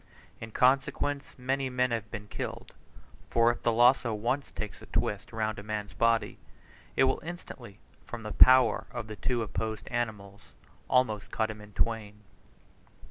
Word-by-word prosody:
In 115 - -7
consequence 140 +4 +2
many 135 +1 -1
men 125 0 +1
have 110 -3 -2
been 105 -2 -7
killed; - - -6 0.6
for 115 0 +4
if 120 - -7
the 120 - +2
lazo 120 0 +4
once 120 +6 -1
takes 105 - -6
a - - -12
twist 105 0 -2
round 110 -1 -2
a - - -6
man's 105 -1 -4
body, 115 -2 +1 0.6
it - - +4
will 130 0 +2
instantly, 135 - -9 0.3
from 115 -1 -8
the 105 - -5
power 120 -3 +6
of 120 -2 -5
the 110 0 -7
two 120 +3 -1
opposed 110 0 -4
animals, 105 -5 -3 0.5
almost 110 -5 +2
cut 110 0 -1
him 105 -1 -10
in 105 0 -14
twain. 105 -2 -2
115 Hz, 160 wpm, -29 LUFS, 105-125 Hz, 0.6 s, power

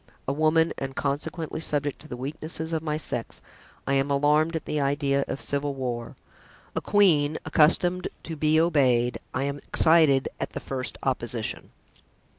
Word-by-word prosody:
A 135 - +1
woman, 155 +2 +3
and 135 0 -5
consequently 150 +4 -3
subject 145 -3 -1
to 155 - -13
the 125 - -6
weaknesses 155 +4 -4
of 160 - 0
my 155 -1 -2
sex, 125 -6 -3 0.5
I 140 - 0
am 135 +1 +2
alarmed 150 +3 +2
at 160 - -3
the 150 - -1
idea 140 0 +1
of 135 - -4
civil 140 0 -1
war; 120 -3 -4 0.6
a - - 0
queen, 155 -8 +3
accustomed 175 +4 +3 0.2
to 165 - -5
be 155 +1 +3
obeyed, 130 -7 +2
I - - -2
am 140 0 -3
excited 155 -6 +4
at - - -4
the - - -4
first 130 -5 -4
opposition." 120 -4 -3
145 Hz, 160 wpm, -26 LUFS, 135-155 Hz, 0.6 s, excited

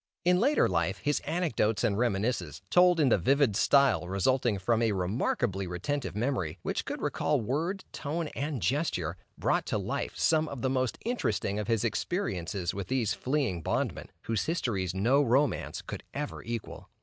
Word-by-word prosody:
In 180 0 +4
later 280 +7 +4
life, 90 +1 0
his 145 0 0
anecdotes 125 - 0
and 110 -4 +2
reminiscences, 100 - -1
told 180 -1 +5
in 145 -4 +4
the 110 - +4
vivid 135 - +3
style, 135 -7 +4
resulting 105 +4 +1
from 115 +4 +1
a 115 -2 +2
remarkably 95 +1 -1
retentive 120 +9 -3
memory, 105 - -1
which - - -2
could - - -5
recall 150 -2 +1
word, 160 - -2
tone, 160 +2 -3
and 140 - -3
gesture, 90 - 0 0.2
brought - - +1
to - - 0
life, - - -3
some 160 -1 +3
of 140 -5 -6
the 130 - +1
most 130 -2 0
interesting 105 - -1
of 105 - -3
his 115 -2 +1
experiences 95 - -2
with 100 -2 -5
these 125 -4 +1
fleeing 130 - -1
bondmen, - - -2
whose 115 -4 -1
histories 100 - -1
no 120 +9 +3
romance 135 0 +1
could - - -6
ever 145 +1 -4
equal. 115 -1 -6
120 Hz, 165 wpm, -29 LUFS, 95-145 Hz, 0.2 s, told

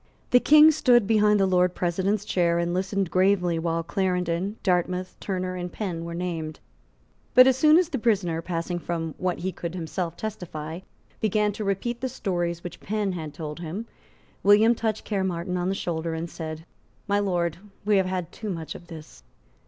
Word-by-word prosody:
The 250 - +7
King 305 +4 +7
stood 245 -7 +4
behind 210 -1 +4
the 195 - +4
Lord 180 -1 +2
President's 190 +4 0
chair 170 -4 +1
and 170 0 0
listened 190 0 -1
gravely 185 -3 +2
while 165 0 -1
Clarendon, 180 +1 -1
Dartmouth, 180 -1 0
Turner 185 -2 -3
and 180 -1 -5
Penn 175 -5 -4
were 170 0 -5
named. 165 -3 -4 0.8
But 255 0 +10
as 265 -1 +4
soon 305 +4 +6
as 355 -2 +2
the 270 - -2
prisoner, 190 -8 +1
passing 175 +1 -3
from 165 -2 -3
what 180 -1 -1
he 190 +2 -3
could 170 -1 -6
himself 170 0 -4
testify, 170 -6 -5 0.4
began 210 0 +1
to 210 - -5
repeat 210 +5 -2
the 260 - -1
stories 175 -6 -2
which 175 -1 -7
Penn 210 -1 -1
had 160 -4 -5
told 150 +1 -7
him, 175 +7 -5 0.6
William 210 +3 +6
touched 220 -2 -2
Caermarthen 185 -3 -2
on 180 +1 -1
the 195 - 0
shoulder 165 -2 -3
and 165 +1 -3
said, 160 -1 -6 0.4
"My 205 0 +2
Lord, 175 -5 0 0.3
we 210 -1 +4
have 190 -1 +2
had 185 -3 -3
too 215 - -6
much 165 -4 -4
of 175 - -12
this." 160 -3 -11
180 Hz, 180 wpm, -25 LUFS, 170-205 Hz, 0.8 s, But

